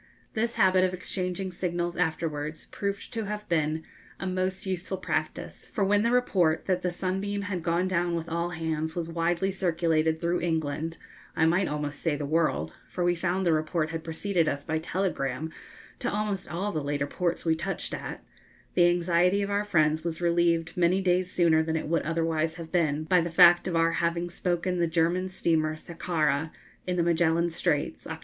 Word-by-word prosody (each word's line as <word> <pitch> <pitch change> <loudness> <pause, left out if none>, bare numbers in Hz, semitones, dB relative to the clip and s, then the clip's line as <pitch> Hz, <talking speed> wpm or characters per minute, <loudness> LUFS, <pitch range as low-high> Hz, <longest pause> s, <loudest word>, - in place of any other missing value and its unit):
(This 235 +2 -1
habit 185 -1 +4
of 185 0 +1
exchanging 185 +1 -3
signals 175 -1 -2
afterwards 155 -3 -2
proved 200 0 -4
to 225 -2 -2
have 210 +1 -5
been 155 -1 0 0.4
a - - -4
most 185 +1 -1
useful 190 0 -3
practice, 185 - -3
for 210 - 0
when 205 +1 +3
the 230 - +2
report 190 -10 +2
that 185 -2 +1
the 180 - 0
'Sunbeam' 195 +3 -2
had 195 -4 -3
gone 170 +2 +1
down 175 -1 0
with 165 0 -3
all 170 +1 -1
hands 160 -2 -2
was 170 -2 -2
widely 170 +3 0
circulated 165 -4 +1
through 170 +2 0
England, 160 -1 -1 0.4
I 160 - +3
might 175 +4 +3
almost 150 -1 -3
say 165 -3 +1
the 145 0 -3
world, 140 - 0
for 180 - -3
we 175 0 +3
found 180 +2 -1
the 170 - +4
report 155 0 0
had 165 -1 -4
preceded 165 0 0
us 140 0 -4
by 160 0 -1
telegram 160 -4 -2 0.5
to - - -1
almost 205 -2 -2
all 190 +5 -2
the 155 -5 -2
later 145 0 -1
ports 175 +4 -2
we 165 - +4
touched 190 +5 -4
at, - - -6 0.5
the 175 -1 +5
anxiety 175 +3 +2
of 200 - -3
our 205 +1 +1
friends 155 -5 +2
was 170 -1 -3
relieved 170 -1 +2
many 180 +2 +3
days 185 -1 +1
sooner 165 -3 +4
than 160 0 -1
it 160 - -2
would 165 +1 +1
otherwise 165 0 0
have 165 -2 -8
been 155 -4 +1
by 180 +2 +3
the 170 - -2
fact 175 +1 +6
of 175 - -1
our 165 0 +3
having 170 +1 -1
spoken 180 0 -1
the 170 - +2
German 170 +3 +1
steamer 155 -4 +1
'Sakhara,' 160 -2 -1 0.4
in 180 - 0
the 175 - +2
Magellan 170 0 +2
Straits, 165 - -1
Oct. - - -5
170 Hz, 190 wpm, -28 LUFS, 160-185 Hz, 0.5 s, fact